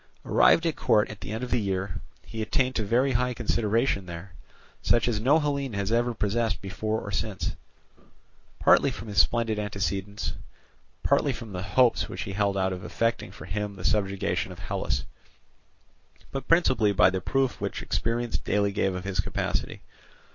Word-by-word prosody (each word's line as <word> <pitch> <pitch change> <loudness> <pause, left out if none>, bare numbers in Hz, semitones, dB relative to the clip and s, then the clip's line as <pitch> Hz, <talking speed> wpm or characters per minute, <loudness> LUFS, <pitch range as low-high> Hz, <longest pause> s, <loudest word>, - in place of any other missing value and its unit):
Arrived 165 - +5
at 165 - +1
court 105 0 +2
at 105 - -11
the - - -6
end 110 +3 -3
of 125 - -5
the 120 - +2
year, 95 -2 -2 0.2
he 110 - -6
attained 130 +3 +1
to 110 - 0
very 120 +6 +2
high 125 0 +1
consideration 115 -3 0
there, 85 +1 -8 0.5
such 120 0 +3
as 115 -3 0
no 135 +8 +4
Hellene 140 -4 -1
has 100 +1 -2
ever 120 0 +1
possessed 110 +2 0
before 110 +3 -2
or 100 - -7
since; 100 +1 -2 1.0
partly - - +5
from 110 - -7
his 100 - +1
splendid 115 -2 0
antecedents, 100 0 -2 0.7
partly - - +3
from 115 -3 -7
the 90 -1 -4
hopes 115 +6 +2
which - - -4
he 95 - -5
held 100 0 +1
out 95 -1 +1
of 90 - -7
effecting 115 0 -1
for - - -10
him 105 +2 -3
the 90 - -8
subjugation 100 -2 0
of - - -9
Hellas, 65 +1 -2 1.3
but 135 -1 -5
principally 130 -11 +4
by 95 -1 +5
the 95 0 -2
proof 135 +3 0
which - - -3
experience 115 +1 -1
daily 100 0 +1
gave 95 -2 0
of 90 - -4
his 100 -2 -3
capacity. - - -2
105 Hz, 175 wpm, -27 LUFS, 100-120 Hz, 1.3 s, Arrived